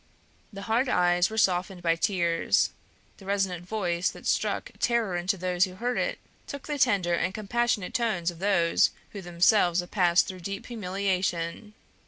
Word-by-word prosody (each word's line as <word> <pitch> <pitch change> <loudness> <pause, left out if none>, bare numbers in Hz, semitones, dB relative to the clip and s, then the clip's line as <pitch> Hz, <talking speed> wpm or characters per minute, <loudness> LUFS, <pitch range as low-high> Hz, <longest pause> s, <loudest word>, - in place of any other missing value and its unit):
The 200 -1 -8
hard 235 +4 +1
eyes 175 -1 +3
were 220 - -7
softened 185 -2 +1
by 165 -1 +3
tears; 170 -2 +1 0.5
the 195 - -14
resonant 190 -3 -1
voice 180 -4 -1
that - - -12
struck - - -1
terror 230 -6 +1
into 180 +3 -1
those 180 +1 +1
who 185 -1 -10
heard 245 +5 -2
it - - -1 0.3
took 280 -1 -7
the 295 -2 -4
tender 195 -9 +2
and 185 +3 -1
compassionate 220 -2 -1
tones 215 -9 0
of 170 - -14
those 180 -4 +3 0.2
who 200 - -7
themselves 175 +1 +3
have 175 - -5
passed 175 -3 +3
through 185 -2 -7
deep 195 +3 -6
humiliation. 195 -2 -2
185 Hz, 165 wpm, -27 LUFS, 175-215 Hz, 0.5 s, eyes